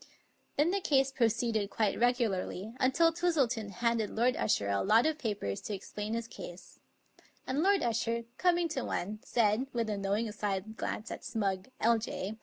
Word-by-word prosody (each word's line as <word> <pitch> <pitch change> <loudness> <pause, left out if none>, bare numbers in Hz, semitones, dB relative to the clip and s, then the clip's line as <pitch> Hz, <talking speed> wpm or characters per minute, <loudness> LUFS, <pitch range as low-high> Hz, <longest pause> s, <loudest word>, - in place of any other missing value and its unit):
Then 300 +4 +3
the 400 - +1
case 270 -5 +3
proceeded 230 -4 +1
quite 215 -2 0
regularly, 225 -4 0
until 330 +6 +4
Twistleton 275 -11 +1
handed 230 -1 0
Lord 245 +3 +2
Usher 100 - +1
a 100 0 +1
lot 220 +5 +4
of 315 -1 0
papers 200 - -2
to 210 - -4
explain 210 +3 -5
his 230 0 -3
case; 175 -5 -10 0.7
and 270 +3 0
Lord 390 0 +3
Usher, 235 0 0 0.2
coming 350 -1 +3
to 275 -4 -2
one, 210 +4 -3
said, 230 +2 +2
with 230 -2 -1
a 205 - -2
knowing 205 +3 0
side 210 0 -3
glance 220 0 -4
at - - -6
Smugg, 195 -3 -2
L.J. 220 -3 0
230 Hz, 165 wpm, -31 LUFS, 205-260 Hz, 0.7 s, until